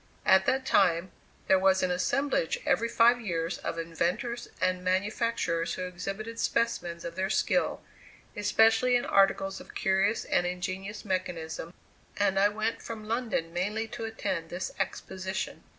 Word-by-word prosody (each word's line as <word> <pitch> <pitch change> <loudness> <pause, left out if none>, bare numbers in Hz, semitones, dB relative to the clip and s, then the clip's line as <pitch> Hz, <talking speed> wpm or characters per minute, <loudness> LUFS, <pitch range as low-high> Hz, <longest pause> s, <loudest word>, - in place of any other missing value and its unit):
At 190 0 +5
that 265 0 +1
time, 170 -4 +3 0.4
there 190 - +5
was 190 0 +3
an 185 - +1
assemblage, 245 - 0
every 230 +6 +2
five 240 +1 +5
years, 170 -4 -2
of - - -4
inventors 170 +9 -2
and 185 0 0
manufacturers 190 -2 0
who 185 - -4
exhibited 195 +5 -5
specimens 175 -8 -1
of 170 0 -5
their 190 +1 -1
skill, - - +1 0.5
especially 225 +4 +4
in 245 - +1
articles 195 0 +2
of - - -14
curious 195 +3 +1
and 175 - +1
ingenious 185 +4 -4
mechanism, 170 -4 -3 0.5
and 195 -1 +2
I 205 +1 +5
went 215 +2 -2
from 220 -2 -7
London 220 -8 -1
mainly 210 +6 -1
to 235 0 -5
attend 195 -7 -3
this 180 +2 -4
exposition. 190 0 -4
190 Hz, 145 wpm, -29 LUFS, 180-225 Hz, 0.5 s, At